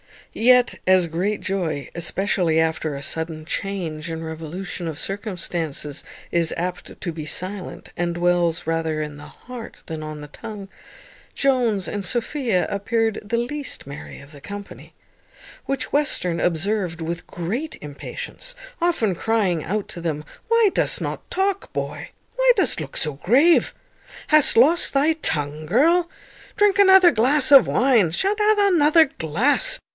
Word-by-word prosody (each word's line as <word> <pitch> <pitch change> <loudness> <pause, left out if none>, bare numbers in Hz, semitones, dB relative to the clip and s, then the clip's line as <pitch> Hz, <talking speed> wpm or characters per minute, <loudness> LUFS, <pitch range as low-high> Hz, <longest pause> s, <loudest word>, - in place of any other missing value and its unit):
Yet, 250 +1 +3
as 185 -2 +4
great 185 +6 -2
joy, 170 -7 -2
especially 175 -1 0
after 160 -2 0
a 140 - -6
sudden 160 +1 -3
change 170 -4 -4
and 165 0 -5
revolution 165 +3 -6
of 160 -2 -5
circumstances, 170 -7 -4 0.3
is 170 -1 +1
apt 180 +1 -5
to 175 - -3
be 155 -2 -7
silent, 185 +4 -5
and 175 0 -1
dwells 175 -1 +1
rather 160 -1 -1
in 150 -1 -6
the 145 0 -11
heart 235 - -11
than 160 -1 -5
on 155 -1 -7
the 150 - -10
tongue, 205 +2 -9 0.7
Jones 245 -8 +1
and 205 -2 -4
Sophia 235 -2 0
appeared 225 +2 -1
the 225 +3 -2
least 275 +4 -3
merry 140 0 -9
of 140 +1 -15
the 145 - -13
whole - - -15
company; 200 0 -9 0.7
which 275 0 -3
Western 230 - +1
observed 175 0 0
with 165 +1 -5
great 220 - -4
impatience, 150 - -7 0.3
often 320 - +1
crying 190 -5 0
out 205 +3 -3
to 175 - -8
them, 155 -3 -3 0.2
"Why 460 -2 +4
dost - - +1
not - - -5
talk, 390 +1 -1
boy? - - -4 0.3
Why - - +5
dost - - +1
look - - -7
so 155 -2 +1
grave? 260 - +3 0.5
Hast 305 -2 +5
lost 300 +9 +4
thy 285 +3 +3
tongue, 150 - -3
girl? 335 - +3 0.5
Drink 410 -1 +3
another 380 -3 +7
glass 265 +4 +3
of 275 -4 +8
wine; 240 -10 +3
sha't 390 - 0
drink 425 0 +3
another 330 -6 +4
glass." 265 - +3
195 Hz, 150 wpm, -22 LUFS, 160-275 Hz, 0.7 s, of